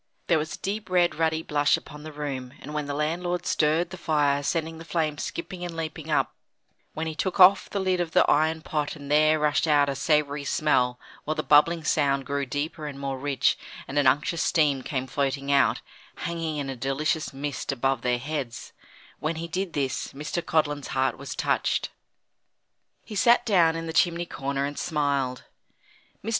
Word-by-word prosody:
There 165 Hz, -3 st, +3 dB
was 155 Hz, +1 st, -4 dB
a -, -, -14 dB
deep 200 Hz, +1 st, -4 dB
red 175 Hz, -1 st, +3 dB
ruddy 160 Hz, 0 st, 0 dB
blush 145 Hz, -2 st, +2 dB
upon 150 Hz, 0 st, -11 dB
the 155 Hz, +1 st, -8 dB
room, 135 Hz, -4 st, -5 dB
and 150 Hz, -, -9 dB
when 150 Hz, -1 st, -2 dB
the 145 Hz, -, -3 dB
landlord 175 Hz, +4 st, -1 dB
stirred 160 Hz, +3 st, +1 dB
the 185 Hz, -, -7 dB
fire, 145 Hz, -4 st, +1 dB
sending 160 Hz, +2 st, -2 dB
the -, -, -8 dB
flame 155 Hz, -3 st, -1 dB
skipping 175 Hz, +1 st, -5 dB
and 170 Hz, -2 st, -5 dB
leaping 160 Hz, -1 st, -5 dB
up 150 Hz, -, +1 dB, 0.6 s
when 160 Hz, -, -2 dB
he 160 Hz, -, -3 dB
took 185 Hz, +4 st, -2 dB
off 190 Hz, +2 st, +7 dB
the 200 Hz, -, -2 dB
lid 185 Hz, -1 st, +1 dB
of 170 Hz, -, -2 dB
the -, -, +4 dB
iron 160 Hz, +1 st, +2 dB
pot 150 Hz, -2 st, -2 dB
and 145 Hz, -2 st, -8 dB
there 155 Hz, +1 st, +5 dB
rushed 150 Hz, +1 st, +1 dB
out 145 Hz, -2 st, +4 dB
a -, -, 0 dB
savoury 145 Hz, 0 st, +1 dB
smell, 125 Hz, -4 st, +1 dB, 0.2 s
while 155 Hz, -, -2 dB
the 155 Hz, -, -2 dB
bubbling 160 Hz, +3 st, +4 dB
sound 140 Hz, -3 st, +1 dB
grew 140 Hz, +1 st, -2 dB
deeper 150 Hz, +3 st, -3 dB
and 140 Hz, -2 st, -7 dB
more 135 Hz, -1 st, -3 dB
rich, 140 Hz, -1 st, +1 dB, 0.3 s
and 140 Hz, +2 st, 0 dB
an 140 Hz, -, +3 dB
unctuous 155 Hz, +6 st, +2 dB
steam 150 Hz, -5 st, +2 dB
came 130 Hz, 0 st, -3 dB
floating 140 Hz, +1 st, -1 dB
out, 140 Hz, -1 st, +3 dB, 0.4 s
hanging 165 Hz, -2 st, -2 dB
in 140 Hz, -2 st, -3 dB
a 135 Hz, -, -4 dB
delicious 135 Hz, +5 st, -1 dB
mist 140 Hz, 0 st, -4 dB
above 135 Hz, -1 st, 0 dB
their 125 Hz, 0 st, +1 dB
heads 130 Hz, -3 st, -5 dB, 0.5 s
when 155 Hz, +2 st, -1 dB
he 165 Hz, +1 st, -5 dB
did 185 Hz, 0 st, -3 dB
this, 135 Hz, -2 st, -2 dB
Mr. 150 Hz, +5 st, -3 dB
Codlin's 150 Hz, -4 st, 0 dB
heart 130 Hz, 0 st, +2 dB
was 140 Hz, -, -6 dB
touched. -, -, 0 dB, 1.1 s
He 220 Hz, -, -9 dB
sat 235 Hz, +4 st, +4 dB
down 175 Hz, -7 st, +4 dB
in 165 Hz, 0 st, -4 dB
the 160 Hz, -, -5 dB
chimney 175 Hz, 0 st, +2 dB
corner 140 Hz, -3 st, -2 dB
and 145 Hz, 0 st, -5 dB
smiled. 140 Hz, -4 st, -1 dB, 0.8 s
Mr. -, -, -2 dB
150 Hz, 190 wpm, -26 LUFS, 140-165 Hz, 1.1 s, off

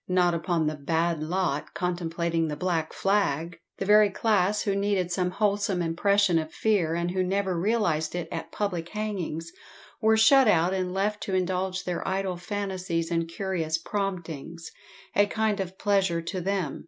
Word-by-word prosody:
Not 180 Hz, -1 st, +3 dB
upon 170 Hz, -1 st, 0 dB
the 155 Hz, -, 0 dB
"bad 165 Hz, +2 st, 0 dB
lot" 165 Hz, -2 st, -2 dB
contemplating 170 Hz, -2 st, -1 dB
the 150 Hz, -, -3 dB
black 165 Hz, -2 st, -1 dB
flag! 170 Hz, -4 st, 0 dB, 0.2 s
The 195 Hz, -, -3 dB
very 210 Hz, +1 st, +6 dB
class 205 Hz, -1 st, +1 dB
who 200 Hz, -2 st, 0 dB
needed 200 Hz, -3 st, 0 dB
some 180 Hz, 0 st, 0 dB
wholesome 200 Hz, -1 st, 0 dB
impression 185 Hz, +1 st, +2 dB
of 155 Hz, 0 st, -5 dB
fear, 185 Hz, -7 st, +1 dB
and 170 Hz, +1 st, -1 dB
who 185 Hz, 0 st, 0 dB
never 190 Hz, 0 st, 0 dB
realised 170 Hz, -5 st, 0 dB
it 175 Hz, -, -3 dB
at -, -, -5 dB
public 180 Hz, -5 st, -2 dB
hangings, 185 Hz, -6 st, -4 dB, 0.5 s
were 220 Hz, 0 st, +4 dB
shut 260 Hz, +4 st, +6 dB
out 175 Hz, -2 st, +3 dB
and 185 Hz, -1 st, -1 dB
left 205 Hz, +3 st, -1 dB
to 190 Hz, -, -1 dB
indulge 185 Hz, +1 st, -1 dB
their 180 Hz, -1 st, -3 dB
idle 190 Hz, -1 st, -1 dB
fancies 185 Hz, -3 st, -3 dB
and 165 Hz, -1 st, 0 dB
curious 170 Hz, -3 st, -2 dB
promptings 170 Hz, -4 st, -4 dB, 0.4 s
a 205 Hz, 0 st, +5 dB
kind 215 Hz, -1 st, 0 dB
of 190 Hz, 0 st, -4 dB
pleasure 190 Hz, -5 st, +1 dB
to 185 Hz, +2 st, -4 dB
them! 190 Hz, -2 st, -2 dB
185 Hz, 165 wpm, -27 LUFS, 170-200 Hz, 0.5 s, very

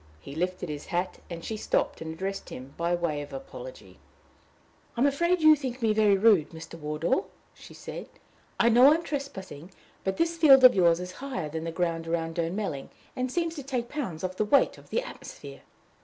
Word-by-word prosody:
He 140 Hz, -, -10 dB
lifted 180 Hz, +3 st, -2 dB
his 150 Hz, -2 st, -6 dB
hat, 180 Hz, +1 st, -2 dB
and 170 Hz, -1 st, -7 dB
she 220 Hz, -, -3 dB
stopped 210 Hz, -, -1 dB
and 160 Hz, 0 st, -5 dB
addressed 190 Hz, +4 st, -5 dB
him 130 Hz, +2 st, -9 dB
by 170 Hz, +1 st, 0 dB
way 165 Hz, -4 st, -2 dB
of 145 Hz, -, -9 dB
apology. 275 Hz, -, -10 dB, 1.0 s
"I -, -, 0 dB
am -, -, +5 dB
afraid 340 Hz, +5 st, +2 dB
you 310 Hz, 0 st, +8 dB
think 260 Hz, -3 st, -5 dB
me 220 Hz, -1 st, +3 dB
very 210 Hz, -2 st, +4 dB
rude, 200 Hz, -7 st, +4 dB
Mr. 165 Hz, 0 st, -10 dB
Wardour," 150 Hz, 0 st, -1 dB, 0.3 s
she -, -, -14 dB
said. -, -, -8 dB, 0.5 s
"I 235 Hz, -, +5 dB
know 245 Hz, +5 st, +7 dB
I -, -, +5 dB
am 335 Hz, -, -3 dB
trespassing, 190 Hz, -, -6 dB, 0.3 s
but 190 Hz, 0 st, -2 dB
this 335 Hz, 0 st, 0 dB
field 270 Hz, -4 st, +8 dB
of 255 Hz, -, +10 dB
yours 170 Hz, -3 st, +4 dB
is 180 Hz, 0 st, -6 dB
higher 190 Hz, -, -5 dB
than 160 Hz, +2 st, -5 dB
the 165 Hz, -, -3 dB
ground 165 Hz, -1 st, -2 dB
about 165 Hz, 0 st, -1 dB
Durnmelling, 165 Hz, -3 st, -3 dB, 0.3 s
and 255 Hz, 0 st, -2 dB
seems 335 Hz, 0 st, -1 dB
to 285 Hz, -, -5 dB
take 250 Hz, -3 st, -3 dB
pounds 230 Hz, -, -4 dB
off 185 Hz, 0 st, -3 dB
the -, -, +2 dB
weight 245 Hz, +7 st, +3 dB
of -, -, -19 dB
the 485 Hz, -, 0 dB
atmosphere." -, -, -10 dB
190 Hz, 200 wpm, -27 LUFS, 165-270 Hz, 1.0 s, of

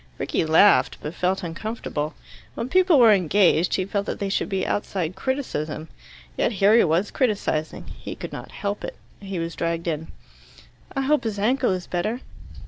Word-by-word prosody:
Rickie -, -, -1 dB
laughed, 165 Hz, +6 st, +5 dB
but 150 Hz, -, -5 dB
felt 185 Hz, +2 st, 0 dB
uncomfortable. 165 Hz, -4 st, -4 dB, 0.4 s
When 240 Hz, -, -4 dB
people 365 Hz, -1 st, +5 dB
were 230 Hz, -4 st, +7 dB
engaged, 180 Hz, -2 st, +3 dB
he 185 Hz, -, 0 dB
felt 200 Hz, +1 st, -2 dB
that -, -, -3 dB
they 200 Hz, -, -2 dB
should -, -, -1 dB
be 190 Hz, -1 st, -1 dB
outside 185 Hz, -4 st, -2 dB
criticism. 160 Hz, -, -3 dB, 0.5 s
Yet -, -, +1 dB
here 205 Hz, +2 st, +4 dB
he 235 Hz, -, +6 dB
was 170 Hz, +4 st, +1 dB
criticizing. 205 Hz, -, -1 dB
He -, -, -8 dB
could -, -, -7 dB
not -, -, -7 dB
help 205 Hz, 0 st, -4 dB
it. -, -, -5 dB, 0.2 s
He 195 Hz, -2 st, -6 dB
was 165 Hz, 0 st, -3 dB
dragged 170 Hz, 0 st, -2 dB
in. 160 Hz, -1 st, -2 dB, 0.9 s
"I 270 Hz, -, +1 dB
hope 295 Hz, +2 st, +2 dB
his 220 Hz, -3 st, -3 dB
ankle 250 Hz, +5 st, +2 dB
is 185 Hz, -2 st, -1 dB
better." 215 Hz, +8 st, -2 dB
195 Hz, 175 wpm, -24 LUFS, 170-225 Hz, 0.9 s, were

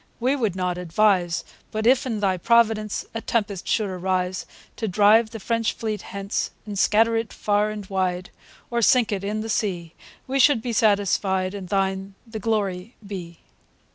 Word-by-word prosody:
We 255 Hz, +4 st, +2 dB
would 220 Hz, -9 st, -1 dB
not 180 Hz, -1 st, -1 dB
advise; 180 Hz, 0 st, +2 dB, 0.3 s
But 220 Hz, 0 st, -3 dB
if, 255 Hz, +2 st, +4 dB
in 220 Hz, -4 st, -2 dB
Thy 190 Hz, -2 st, +2 dB
Providence, 220 Hz, 0 st, +2 dB
A 225 Hz, -, -4 dB
Tempest 205 Hz, -6 st, -2 dB
should 215 Hz, -2 st, +1 dB
arise, 185 Hz, 0 st, -2 dB, 0.3 s
To 225 Hz, -, -2 dB
drive 215 Hz, +3 st, +5 dB
the 225 Hz, -, -8 dB
French 230 Hz, +1 st, 0 dB
fleet 215 Hz, -2 st, -4 dB
hence, 200 Hz, 0 st, -3 dB, 0.2 s
And 205 Hz, -2 st, -4 dB
scatter 225 Hz, +3 st, +4 dB
it 225 Hz, 0 st, -2 dB
far 210 Hz, 0 st, +1 dB
and 210 Hz, -1 st, -6 dB
wide, 185 Hz, -1 st, -2 dB, 0.4 s
Or 235 Hz, 0 st, +1 dB
sink 240 Hz, 0 st, +4 dB
it 195 Hz, -2 st, -2 dB
in 210 Hz, +2 st, -2 dB
the 220 Hz, -, -5 dB
sea, 175 Hz, -6 st, -2 dB, 0.3 s
We 270 Hz, +1 st, -1 dB
should 265 Hz, -4 st, +5 dB
be 240 Hz, -, -2 dB
satisfied, 200 Hz, -3 st, +2 dB
And 195 Hz, -3 st, -7 dB
Thine 195 Hz, 0 st, -1 dB
the 225 Hz, -1 st, -7 dB
Glory 205 Hz, -1 st, -2 dB
be. 175 Hz, -4 st, -8 dB
205 Hz, 170 wpm, -24 LUFS, 190-225 Hz, 0.4 s, drive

